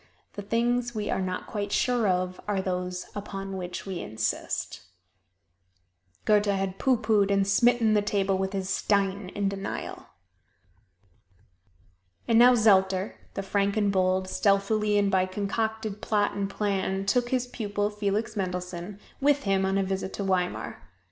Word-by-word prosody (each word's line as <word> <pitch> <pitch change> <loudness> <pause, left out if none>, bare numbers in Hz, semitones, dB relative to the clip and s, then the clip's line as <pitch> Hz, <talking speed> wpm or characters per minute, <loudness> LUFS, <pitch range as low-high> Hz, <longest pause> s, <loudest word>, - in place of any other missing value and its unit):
The 205 - -6
things 240 +3 0
we 210 -1 -2
are - - 0
not 185 -1 -3
quite 205 -1 -4
sure 245 -2 +2
of 185 0 -1
are 205 -2 0
those 180 -1 -3
upon 195 -1 -5
which 180 -1 -5
we 190 -3 -4
insist. 110 +1 -3 1.4
Goethe 210 -1 +4
had 195 -1 -1
pooh 260 -2 +3
poohed 210 -4 +2
and 195 -1 +2
smitten 235 +1 +4
the 210 - +4
table 200 -1 0
with 190 +1 -2
his 190 -1 -2
"stein" 195 -1 0
in 200 -1 0
denial. 195 0 -5 2.2
And 230 -1 +5
now 250 +1 +8
Zelter, 195 -3 +3 0.2
the 195 - -3
frank 200 +1 0
and 205 -2 +2
bold, 185 0 +1
stealthily 205 +2 +2
and 200 -1 +2
by 185 -1 +2
concocted 215 +2 -2
plot 205 -1 +1
and 200 -1 -2
plan 195 -1 -1
took 240 +4 +1
his 255 -1 +1
pupil, 205 -4 -2
Felix 210 +1 -2
Mendelssohn, 180 0 -4 0.2
with 285 +1 +3
him 195 -1 +1
on 195 +1 +1
a 195 - +2
visit 190 0 -3
to 200 - -3
Weimar. 185 -2 -1
200 Hz, 150 wpm, -27 LUFS, 190-215 Hz, 2.2 s, now